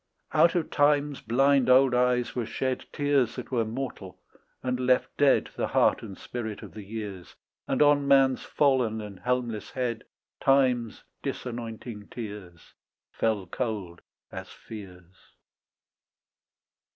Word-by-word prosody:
Out 170 - +5
of 170 -3 -1
time's 145 -1 +2
blind 135 +3 +3
old 130 0 +6
eyes 125 0 +2
were 120 -3 -2
shed 130 -1 -2
Tears 145 -5 +1
that 125 - -7
were 120 -3 +2
mortal, 110 -5 -6 0.4
and 125 0 -1
left 125 0 +2
dead 145 -1 +3
The - - -1
heart - - +3
and 100 -4 -9
spirit 110 -4 -6
of - - -10
the 110 - -8
years, 100 -3 -7 0.3
And - - +3
on 145 -1 +4
mans 135 -2 +5
fallen 130 -6 +1
and 105 -3 -8
helmless 125 -4 -2
head 120 -3 -3 0.3
Time's 130 -4 +2 0.2
disanointing 115 -3 -6
tears 100 -7 -9 0.4
Fell 110 -4 0
cold 100 -4 -4 0.3
as - - -7
fears. 90 -4 -12
120 Hz, 125 wpm, -27 LUFS, 105-135 Hz, 0.4 s, old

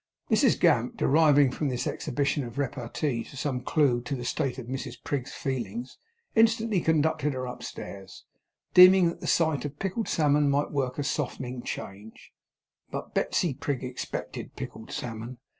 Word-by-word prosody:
Mrs - - +4
Gamp, - - +3
deriving 145 -2 +5
from 145 +2 -2
this 125 -1 -2
exhibition 145 +2 -1
of 120 0 -8
repartee 125 -1 -2
some 135 -2 -3
clue 130 -3 +2
to 120 +3 -3
the 120 -2 -6
state 125 +1 -1
of 130 - -6
Mrs 130 0 -5
Prig's 135 -2 -3
feelings, 120 -2 -4 0.4
instantly 225 -3 +3
conducted 155 -2 +1
her 130 0 -3
upstairs; 100 -5 -8 0.5
deeming 180 -1 +8
that 170 - -7
the - - -5
sight 160 -5 +2
of 145 0 -6
pickled 195 +5 -2
salmon 145 -2 +3
might 140 +1 +1
work 130 -3 -1
a 145 - -1
softening 130 -3 -3
change. 105 -1 -8 0.6
But - - -6
Betsey 170 -6 +1
Prig 135 -1 -3
expected 125 0 -5
pickled 110 0 -8
salmon. 115 +1 -5
135 Hz, 150 wpm, -27 LUFS, 125-150 Hz, 0.6 s, deeming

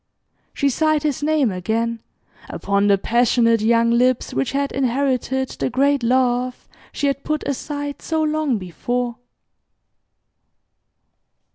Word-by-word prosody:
She 280 - 0
sighed 310 +2 +1
his 295 -3 -1
name 295 -6 +2
again, 225 +5 -2 0.5
upon 200 0 0
the 200 -1 +4
passionate 230 +1 +2
young 230 +1 +3
lips 250 +1 +1
which 135 0 -1
had 280 0 -1
inherited 265 0 0
the - - -3
great 275 +2 +2
love 250 +1 0 0.2
she 285 - -3
had 275 -1 -1
put 305 -1 -2
aside 285 +1 -4
so 320 -1 -1
long 305 -5 0
before. 235 +6 -3
255 Hz, 120 wpm, -21 LUFS, 230-280 Hz, 0.5 s, the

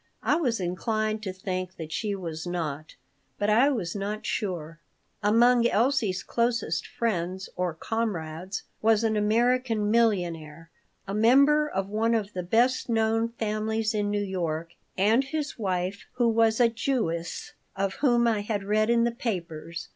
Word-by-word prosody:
I - - +3
was 255 -9 0
inclined 215 +4 -1
to 195 -3 -4
think 185 -1 -4
that 160 -3 -8
she 205 +5 -2
was 165 -3 -6
not, 155 -4 -4 0.4
but 205 +1 +1
I 245 +7 +5
was 210 -11 -2
not 205 +2 -4
sure 165 -5 -3 0.4
Among 235 +3 +4
Elsie's 230 -5 +1
closest 235 -8 -1
friends 190 -4 -2
or 180 -2 -1
"comrades" 185 -3 -3 0.2
was 225 0 +3
an 220 -1 +1
American 225 0 +2
millionaire 170 -8 0 0.4
a 195 - -4
member 280 +8 +5
of 195 -4 -2
one 225 +3 +1
of 210 -2 -2
the 180 - -3
best 240 +9 +2
known 225 0 +2
families 220 0 -1
in 205 -1 0
New 205 0 0
York 170 -4 -3 0.2
and 220 +7 +4
his 295 -2 -4
wife, 185 -1 -2
who 245 -1 +2
was 225 0 +3
a 240 - +6
Jewess, 225 -8 -2 0.2
of 195 0 -1
whom 240 -4 +3
I 225 -2 +2
had 205 -1 -2
read 215 +2 +1
in 235 0 +4
the 235 - +2
papers. 170 - -5
210 Hz, 155 wpm, -27 LUFS, 180-230 Hz, 0.4 s, a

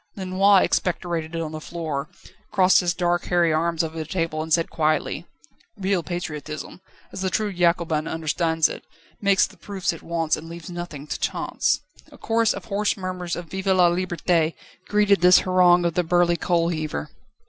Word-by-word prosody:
Lenoir 190 +1 +4
expectorated 170 -2 -1
on 165 -2 -3
the 155 0 -6
floor, 155 -3 -4 0.4
crossed 185 0 +5
his 175 -2 +1
dark 175 0 0
hairy 175 -3 +2
arms 165 +1 +1
over 160 0 -5
the - - -2
table, 165 -1 -2
and 160 +1 -6
said 165 +1 +3
quietly: 155 +2 0 0.5
"Real 195 -2 0
patriotism, 155 -1 -6 0.3
as - - -6
the 190 - 0
true 210 +1 -1
Jacobin 170 -3 +1
understands 160 0 +1
it, - - -8 0.4
makes 200 -2 +4
the - - -14
proofs 195 -3 -3
it 165 - -10
wants 165 -2 0
and 160 +1 -9
leaves 170 +1 -9
nothing 175 -5 -7
to 150 - -5
chance." - - 0 0.3
A - - -14
chorus 225 -1 +1
of - - -5
hoarse 210 -1 0
murmurs 185 -2 -4
of 175 - -6
"Vive 190 +1 -4
la 180 -2 +5
Liberté!" 175 -2 0 0.3
greeted 205 -3 +3
this 180 +1 +7
harangue 180 -1 +4
of 170 - +1
the 180 - +2
burly 175 0 +3
coal 170 0 +1
heaver. 155 - -4
175 Hz, 175 wpm, -23 LUFS, 160-185 Hz, 0.5 s, this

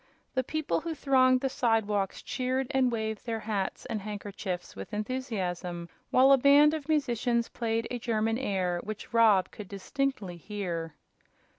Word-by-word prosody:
The 260 - +1
people 295 - -1
who 330 -1 -4
thronged 255 -3 +4
the 270 - +1
sidewalks 215 -6 0
cheered 260 +1 -1
and 260 -3 +3
waved 220 0 -3
their 225 -1 -2
hats 205 -3 -3
and 215 - -3
handkerchiefs 200 -3 -5
with 95 - -7
enthusiasm, 190 -7 -3 0.2
while 265 +2 +6
a 275 - +7
band 285 +3 +6
of 315 -1 -5
musicians 240 -5 +1
played 230 -1 -1
a 245 - -2
German 225 0 0
air, 185 -7 0
which 215 +2 -7
Rob 215 -5 +5
could 210 - -9
distinctly 200 -2 -3
hear. 170 -4 -4
225 Hz, 150 wpm, -29 LUFS, 200-260 Hz, 0.2 s, a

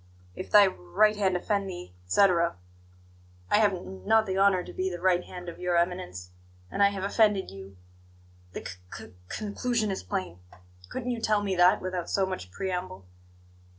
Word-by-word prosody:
'If 185 - -7
thy 205 -1 +8
r 190 - 0
right 150 - +2
hand 190 -3 +1
offend 200 +1 -1
thee,' 90 - -8
etc. 170 - +3 1.0
I - - +5
have 210 -2 +4
n 190 +1 -8
not 220 +1 +4
the 190 - -2
honour 195 -2 +3
to - - -10
be 185 +1 -1
the 175 -1 -6
right 180 0 +2
hand 180 -1 -9
of 170 - -8
Your 180 -1 +1
Eminence, 170 - -2 0.4
and - - -2
I 200 - +7
have 195 -1 -5
offended 205 -1 +2
you; 95 0 -11 0.8
the - - -7
c - - -4 0.2
c - - -10 0.2
conclusion 215 +1 -1
is 190 - -3
plain. 90 -1 -4 0.5
Couldn't 250 -1 -3
you 235 -2 -3
tell 210 -2 +2
me 195 -2 -1
that 180 +1 +4
without 185 -2 -3
so 195 - +2
much 185 - -5
preamble?" 180 - -4
185 Hz, 185 wpm, -28 LUFS, 175-200 Hz, 1.0 s, thy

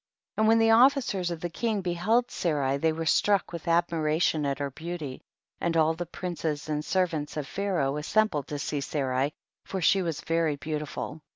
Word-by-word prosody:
14. - - +1
And - - +4
when 225 +1 +6
the 225 0 +4
officers 240 -7 +4
of 170 -2 -5
the 175 - -2
king 220 +2 -1
beheld 205 +8 +1
Sarai 140 -5 0
they 160 +3 +2
were 165 +1 -3
struck 200 +3 +2
with 170 0 -7
admiration 165 -2 +1
at 140 -1 -1
her 140 -1 -3
beauty, 155 -2 -6 0.4
and 170 -1 0
all 160 0 +4
the 175 +1 -5
princes 160 -5 -4
and 150 0 -1
servants 160 -4 -1
of 150 - -2
Pha 200 +7 -3
raoh 140 -3 0
assembled 170 -3 +1
to 145 - -4
see 145 0 -2
Sarai, 135 -1 -1 0.3
for 190 - -4
she 190 +3 +4
was 165 -4 -3
very 165 -2 +1
beautiful. 150 +1 -5
165 Hz, 190 wpm, -27 LUFS, 150-185 Hz, 0.4 s, when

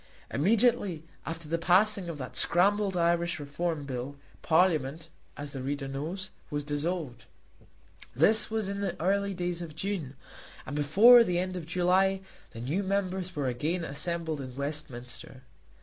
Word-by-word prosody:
Immediately 200 - +2 0.2
after 165 -1 -5
the 165 +2 -1
passing 185 +2 +3
of 165 - -5
that 130 -3 -7
scrambled 195 +2 +3
Irish 170 0 +1
Reform 150 +1 -3
Bill, 130 +1 -5 0.3
Parliament, 160 -2 +2 0.3
as 145 0 -5
the 135 - -5
reader 140 +1 -3
knows, 160 +8 -5 0.2
was 145 -1 -2
dissolved. 145 -4 -3 0.9
This 210 - +3
was 220 -2 -1
in 200 0 -3
the 190 -3 -3
early 200 +3 +1
days 175 -1 -2
of 160 -3 -7
June, 165 -7 -3 0.5
and 140 - -5
before 205 +12 +7
the 180 -5 0
end 185 +1 -2
of 170 -3 -6
July 185 +2 +2 0.3
the 115 - -9
new 150 +11 -1
members 190 -2 -2
were 145 -3 -1
again 155 +8 -1
assembled 160 0 -2
at 130 -2 -7
Westminster. 130 -3 -6
170 Hz, 150 wpm, -29 LUFS, 145-190 Hz, 0.9 s, before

